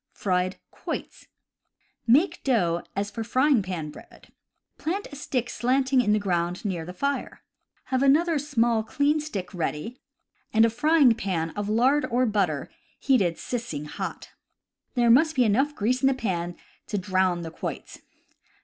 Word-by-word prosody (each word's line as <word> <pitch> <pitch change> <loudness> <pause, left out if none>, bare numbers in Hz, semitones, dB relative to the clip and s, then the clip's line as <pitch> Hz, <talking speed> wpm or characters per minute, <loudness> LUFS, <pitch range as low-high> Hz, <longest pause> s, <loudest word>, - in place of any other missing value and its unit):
Fried 185 -1 -1
Quoits. - - -6 0.4
— - - -45
Make 360 +6 -1
dough 175 -10 +1
as 205 +1 -2
for 225 - -4
frying 255 +2 +3
pan 175 -5 -5
bread. - - -16 0.5
Plant 380 +6 -2
a - - -8
stick 255 -4 -2
slanting 260 +2 +2
in 210 -3 +1
the 210 - +4
ground 180 -2 -1
near 175 -5 -2
the 180 - -7
fire. 280 +9 -3 0.4
Have 260 -1 -1
another 305 +4 +4
small, 240 -6 +1
clean 285 +7 +1
stick 205 -12 -5
ready, 175 +7 -4 0.5
and 220 0 +5
a 230 - +1
frying 285 +1 +4
pan 180 -7 -2
of 205 +3 -4
lard 255 +7 +3
or 250 +1 +2
butter 195 - 0 0.3
heated 200 -11 +2
sissing 230 - -4
hot. 150 - -6 0.6
There 240 -2 +4
must 315 +6 +4
be 255 - +4
enough 265 +7 +2
grease 250 +3 0
in 270 - +4
the 270 - +3
pan 175 -8 -2 0.3
to 210 - -2
drown 185 -2 +1
the 165 - -6
quoits. - - -6
230 Hz, 160 wpm, -26 LUFS, 185-270 Hz, 0.6 s, and